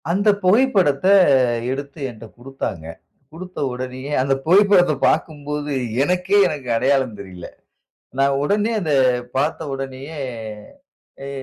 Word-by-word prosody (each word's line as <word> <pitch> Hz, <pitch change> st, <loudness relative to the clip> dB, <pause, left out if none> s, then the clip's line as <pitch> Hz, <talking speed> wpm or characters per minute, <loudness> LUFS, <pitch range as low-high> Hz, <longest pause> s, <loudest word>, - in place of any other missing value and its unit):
அந்த 200 Hz, +5 st, +2 dB
புகைப்படத்த 190 Hz, -, +3 dB, 0.6 s
எடுத்து 140 Hz, +3 st, -6 dB
என்ட்ட 115 Hz, -1 st, -11 dB
குடுத்தாங்க. 120 Hz, -10 st, -6 dB, 0.5 s
குடுத்த 180 Hz, +3 st, -9 dB
உடனேயே, 130 Hz, +2 st, -6 dB
அந்த 135 Hz, +1 st, +1 dB
புகைப்படத்த 185 Hz, -1 st, +5 dB
பாக்கும்போது, 150 Hz, -1 st, -2 dB, 0.3 s
எனக்கே 180 Hz, +4 st, +1 dB
எனக்கு 140 Hz, -7 st, -6 dB
அடையாளம் 130 Hz, -3 st, +1 dB
தெரியல. 95 Hz, -3 st, -9 dB, 0.7 s
நான் 140 Hz, 0 st, +3 dB
உடனே 205 Hz, +8 st, 0 dB
அத 160 Hz, -5 st, -3 dB, 0.5 s
பாத்த 145 Hz, +5 st, 0 dB
உடனேயே, 135 Hz, +3 st, -7 dB, 1.1 s
எ -, -, -6 dB
145 Hz, 105 wpm, -20 LUFS, 135-180 Hz, 1.1 s, புகைப்படத்த